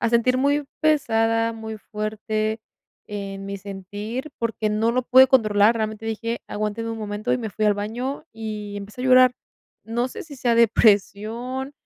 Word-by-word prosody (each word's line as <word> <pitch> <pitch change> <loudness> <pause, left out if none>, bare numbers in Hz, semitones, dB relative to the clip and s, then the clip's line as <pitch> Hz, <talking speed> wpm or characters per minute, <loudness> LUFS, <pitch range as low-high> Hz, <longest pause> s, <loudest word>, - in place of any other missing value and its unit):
a 230 - +2
sentir 240 +2 +3
muy 285 +2 +2 0.2
pesada, 230 -7 +2
muy 220 -1 -7
fuerte 215 +1 -3 0.5
en 195 -1 -6
mi 200 0 -4
sentir, 205 +7 -6
porque 225 -2 -1
no 215 +2 +1
lo 255 +1 +1
pude 260 +2 +7
controlar. 215 -3 +4
Realmente, 220 0 -3
dije: 230 +1 -3
"Aguántenme 215 +2 -3
un 225 - -5
momento", 215 +2 -3
y 250 - +1
me 225 -3 -4
fui 215 +1 -2
al 210 -1 +4
baño 240 +9 -4
y 215 -2 -6
empecé 205 +4 -8
a - - -2
llorar. 255 -1 +6 0.5
No 240 +3 -1
sé, - - -8
si 295 -3 -11
sea 240 -2 +1
depresión. 230 +4 +2
225 Hz, 165 wpm, -23 LUFS, 210-245 Hz, 0.5 s, pude